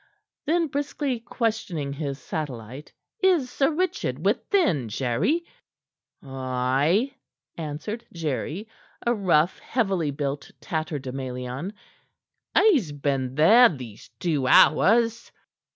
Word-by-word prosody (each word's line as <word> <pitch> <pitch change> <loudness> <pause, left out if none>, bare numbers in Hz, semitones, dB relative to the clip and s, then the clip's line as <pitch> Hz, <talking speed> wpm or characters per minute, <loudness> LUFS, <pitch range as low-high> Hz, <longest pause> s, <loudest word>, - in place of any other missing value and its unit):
Then, 335 +2 +2
briskly 285 -3 -2
questioning 220 - -2
his 140 -2 -4
satellite: 135 -2 -6 0.3
"Is 350 - +3
Sir 275 - +2
Richard 360 +4 -2
within, 170 - +1
Jerry?" 130 - 0 0.8
"Ay," 135 - 0 0.4
answered 165 +9 -5
Jerry 160 - -3 0.4
a 240 - +3
rough, 175 -6 +2
heavily 195 - 0
built 140 0 -3
tatterdemalion. 135 0 -4 0.8
"He's 285 - +4
been 135 -3 -2
there 225 - +7
these 125 -8 -9
two 150 -7 0
hours." 230 - +4
160 Hz, 90 wpm, -25 LUFS, -, 0.8 s, there